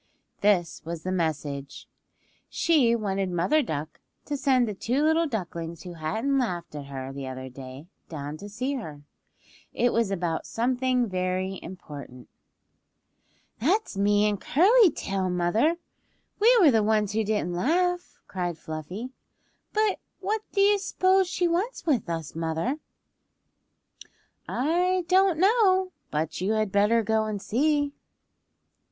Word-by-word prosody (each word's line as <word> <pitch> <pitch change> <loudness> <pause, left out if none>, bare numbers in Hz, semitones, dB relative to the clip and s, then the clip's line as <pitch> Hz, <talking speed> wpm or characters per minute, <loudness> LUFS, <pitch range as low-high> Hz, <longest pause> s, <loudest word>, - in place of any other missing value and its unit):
This 190 -5 +2
was 165 0 -6
the 185 - -2
message. 150 -5 -3 0.6
She 275 -9 +3
wanted 195 -4 -1
Mother 180 - +2
Duck 155 - -5 0.3
to 295 - -2
send 260 -4 +2
the 210 - -3
two 245 +8 -1
little 320 +1 +3
ducklings 170 - -5
who 180 - -8
hadn't 220 - -1
laughed 180 -12 -3
at 145 -2 -6
her 135 -1 -6
the 135 -1 -6
other 130 0 -6
day 130 +2 -10 0.2
down 145 -2 -5
to 205 +5 -9
see 255 +7 -2
her. 155 - -6 0.7
It 245 0 +2
was 230 -3 +2
about 170 -4 -2
something 250 +1 +1
very 185 0 -2
important. 145 -8 -10 1.3
"That's 365 - +1
me 205 +1 +3
and 205 -2 -1
Curly 400 - +5
Tail, 195 - -2
mother! 180 - +2 0.6
We 475 +4 +6
were 325 -8 +7
the 225 -2 +3
ones 210 -1 +1
who 220 +1 +1
didn't 210 -4 -1
laugh," 350 - 0
cried 175 -3 -3
Fluffy. 170 +11 -6 0.6
"But 430 -2 +1 0.2
what 415 +3 -1
do 395 - +1
you 405 0 +5
s'pose 380 0 +2
she 355 0 0
wants 370 +9 -1
with 260 - +1
us, 165 -3 -4
mother?" 165 - -2 1.7
"I 355 +6 +1
don't 375 -2 +4
know, 380 -1 +3 0.2
but 155 +3 -2
you 200 +4 +1
had 215 -2 0
better 210 +3 +3
go 220 +1 +1
and 215 -2 -3
see." 285 +6 +1
215 Hz, 140 wpm, -26 LUFS, -, 1.7 s, were